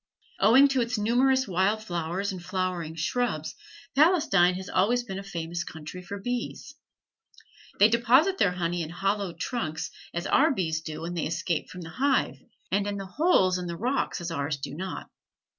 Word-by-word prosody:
Owing 250 Hz, +8 st, +7 dB
to 265 Hz, -2 st, +1 dB
its 235 Hz, 0 st, -1 dB
numerous 255 Hz, +5 st, +2 dB
wild 195 Hz, +4 st, +1 dB
flowers 175 Hz, +2 st, -2 dB
and 185 Hz, -2 st, -7 dB
flowering 180 Hz, -3 st, -2 dB
shrubs, 165 Hz, -1 st, -1 dB, 0.4 s
Palestine 280 Hz, -, +4 dB
has 190 Hz, +1 st, -6 dB
always 235 Hz, +7 st, +2 dB
been 195 Hz, -5 st, -6 dB
a -, -, -7 dB
famous 175 Hz, -2 st, -4 dB
country 160 Hz, +2 st, -8 dB
for 200 Hz, +3 st, -7 dB
bees. 245 Hz, +4 st, -4 dB, 1.0 s
They 205 Hz, -, +7 dB
deposit 250 Hz, -, +3 dB
their 180 Hz, -, +3 dB
honey 175 Hz, -1 st, -1 dB
in 155 Hz, -, -4 dB
hollow 195 Hz, +2 st, -1 dB
trees 165 Hz, -, -3 dB, 0.2 s
as 170 Hz, +1 st, -4 dB
our 310 Hz, +4 st, +4 dB
bees 160 Hz, -, -1 dB
do 155 Hz, -1 st, -6 dB
when 170 Hz, +2 st, -4 dB
they 170 Hz, -, -1 dB
escape 165 Hz, +1 st, -2 dB
from 180 Hz, -, -9 dB
the 165 Hz, -1 st, -8 dB
hive, 275 Hz, -, +1 dB, 0.3 s
and 200 Hz, +1 st, +1 dB
in 205 Hz, 0 st, -2 dB
holes 195 Hz, -, +2 dB
in 180 Hz, -, -5 dB
the 170 Hz, 0 st, -5 dB
rocks 250 Hz, +7 st, -1 dB
as 170 Hz, -1 st, -4 dB
ours 145 Hz, -1 st, -2 dB
do 135 Hz, 0 st, -6 dB
not. 185 Hz, +5 st, -5 dB
190 Hz, 175 wpm, -27 LUFS, 170-235 Hz, 1.0 s, Owing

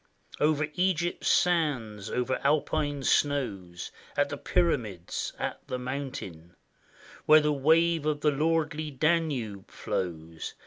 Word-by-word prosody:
Over 150 Hz, 0 st, +2 dB
Egypt's 175 Hz, -1 st, 0 dB
sands, 130 Hz, -, +1 dB
over 125 Hz, +1 st, -1 dB
Alpine 145 Hz, -1 st, +1 dB
snows, 105 Hz, -14 st, 0 dB, 0.3 s
At -, -, +2 dB
the -, -, -4 dB
Pyramids, 90 Hz, 0 st, -1 dB
at -, -, -3 dB
the 130 Hz, -, -3 dB
mountain, 125 Hz, -, -6 dB, 0.7 s
Where 155 Hz, 0 st, +9 dB
the 150 Hz, 0 st, +1 dB
wave 160 Hz, +2 st, +3 dB
of 150 Hz, -1 st, 0 dB
the 150 Hz, -, +3 dB
lordly 155 Hz, +1 st, 0 dB
Danube 140 Hz, -, 0 dB
flows. 80 Hz, -3 st, -4 dB
145 Hz, 115 wpm, -28 LUFS, 105-155 Hz, 0.7 s, Where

